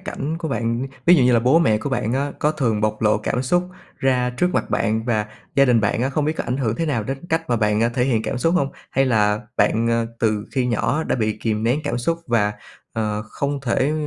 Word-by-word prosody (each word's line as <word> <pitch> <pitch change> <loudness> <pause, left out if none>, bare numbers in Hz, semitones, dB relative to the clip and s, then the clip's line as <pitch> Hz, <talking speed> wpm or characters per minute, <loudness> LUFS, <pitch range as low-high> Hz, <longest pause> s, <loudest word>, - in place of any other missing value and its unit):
cảnh 165 -5 -4
của 160 -2 -4
bạn, 120 0 -1 0.2
ví 175 - +8
dụ 140 - +4
như 125 - +4
là 115 - +4
bố 130 +7 +4
mẹ 110 -10 +3
của 140 - -4
bạn 120 -2 -1
á 140 +2 -1
có 150 +1 +1
thường 115 -8 0
bộc 110 +1 -1
lộ 105 -1 +3
cảm 125 +4 -1
xúc 175 +7 +1 0.3
ra 125 -2 +1
trước 180 +9 0
mặt - - -1
bạn, 110 0 0
và 110 -3 0 0.3
gia 140 - +5
đình 120 -4 +4
bạn 105 +3 0
á 135 - 0
không 145 +1 0
biết 155 - +1
có - - -3
ảnh 125 - -2
hưởng 115 -5 -1
thế 165 - -1
nào 120 -7 0
đến 135 +7 -5
cách 160 0 +1
mà 120 - +3
bạn 105 -1 +1
thể 125 0 +2
hiện 115 -5 +1
cảm 125 - -3
xúc 165 +7 +1
hông? 140 -5 +2 0.2
Hay 135 +1 +2
là 105 -3 +2 0.2
bạn, 115 +1 +2
à, 115 0 +1
từ 110 -2 0
khi 130 -2 0
nhỏ 140 +6 0
đã - - 0
bị 110 -2 -1
kìm 110 -1 -1
nén 125 +6 +1
cảm 120 - -1
xúc 165 +7 -1
và, 105 -4 +2 0.4
ờ, 105 -2 -2
không 140 +5 -3
thể 135 +3 +1
125 Hz, 255 wpm, -21 LUFS, 110-140 Hz, 0.4 s, ví